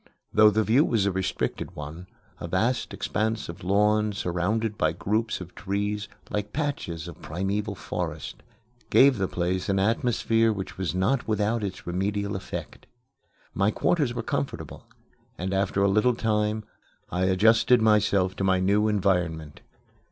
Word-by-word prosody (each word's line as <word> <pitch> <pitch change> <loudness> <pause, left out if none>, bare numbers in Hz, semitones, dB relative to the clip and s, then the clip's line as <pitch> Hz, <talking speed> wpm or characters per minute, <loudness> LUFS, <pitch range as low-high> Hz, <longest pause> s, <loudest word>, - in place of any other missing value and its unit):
Though 110 0 +7
the 110 +1 +1
view 120 +7 +4
was 110 -9 +1
a 100 - +2
restricted 95 0 -3
one, 80 +5 -8 0.3
a - - -5
vast 110 +9 0
expanse 110 -1 -2
of 85 +4 -8
lawn, 105 +2 +2
surrounded 100 +4 -1
by 80 -6 +1
groups 110 +6 -1
of 90 -1 -9
trees, 105 +1 -2 0.2
like 105 0 -2
patches 110 - -3
of 85 - -10
primeval 100 +5 -2
forest, - - -5 0.5
gave 135 -4 +5
the 95 - +1
place 90 +2 -2
an 95 - +2
atmosphere 115 +2 +2
which 95 -3 -5
was 90 -2 -3
not 105 +8 +1
without 110 +1 0
its 95 -2 -5
remedial 100 +3 -2
effect. 95 - -7 0.7
My 100 +1 +2
quarters 135 +1 +1
were - - -3
comfortable, - - -4 0.5
and 95 +2 -3
after 95 0 +1
a - - +4
little 105 +5 +3
time 105 -1 0 0.5
I 90 +1 0
adjusted 110 +6 +4
myself 105 -4 +3
to - - -2
my 95 -1 +3
new 100 +3 +2
environment. 90 -7 0
100 Hz, 150 wpm, -26 LUFS, 95-110 Hz, 0.7 s, Though